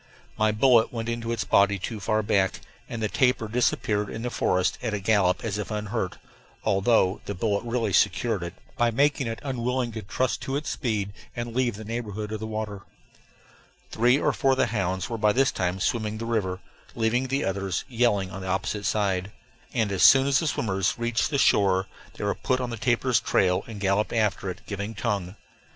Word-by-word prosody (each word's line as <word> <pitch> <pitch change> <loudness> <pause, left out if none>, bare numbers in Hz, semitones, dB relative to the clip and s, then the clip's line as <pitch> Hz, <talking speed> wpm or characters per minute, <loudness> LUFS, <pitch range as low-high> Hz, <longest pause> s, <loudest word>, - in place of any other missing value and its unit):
My 110 0 +2
bullet 115 +1 +4
went 115 -1 -4
into 115 0 -3
its 115 - -1
body 100 0 +3
too 105 +3 -5
far 110 +2 0
back, 95 -3 +1 0.3
and 115 -2 -4
the - - +2
tapir 125 -1 +1
disappeared 105 -3 0
in 115 - -6
the 125 - -2
forest 90 -4 +1
at 110 -4 -2
a - - -2
gallop 95 -3 +2
as 105 -2 -2
if 105 - -4
unhurt, 105 -2 -3 0.5
although 100 -1 +2
the 100 - -4
bullet 100 +1 0
really 115 -4 -1
secured 105 +3 +2
it, 85 +1 -6 0.2
by 120 -2 +2
making 140 +2 +1
it 115 0 -3
unwilling 125 -2 -1
to 110 0 -6
trust 120 +5 -1
to 135 - -3
its 150 +1 -2
speed 105 -6 -2 0.2
and 120 -1 -5
leave 125 -4 +1
the 110 +1 -9
neighborhood 110 -2 -4
of 110 - -3
the 110 - -5
water. 110 -2 -4 1.1
Three 120 +4 +4
or 150 - +1
four 135 -1 +2
of - - -2
the - - +3
hounds 95 -3 -1
were 115 -2 -4
by 105 -1 +3
this 135 +3 +3
time 90 0 -2
swimming 110 +1 -1
the 115 - -5
river, 100 -6 -1 0.3
leaving 120 +3 +1
the 135 +2 0
others 95 -1 -2
yelling 115 -6 +1
on 95 - -7
the 95 - -6
opposite 100 +2 -1
side; 95 -2 0 0.4
and 110 -5 0
as 95 - -1
soon 135 -1 +8
as 140 -1 +3
the 160 - -1
swimmers 95 - 0
reached 120 -1 0
the 145 - 0
shore 95 -6 +3 0.3
they - - -6
were - - +1
put 130 - -1
on 125 -1 -3
the - - -3
tapir's 120 +1 +2
trail 90 -1 +2
and 110 -3 -8
galloped 100 +1 +1
after 105 -4 0
it, 90 - -7
giving 100 +2 -5
tongue. 100 -4 -2
110 Hz, 205 wpm, -26 LUFS, 100-120 Hz, 1.1 s, soon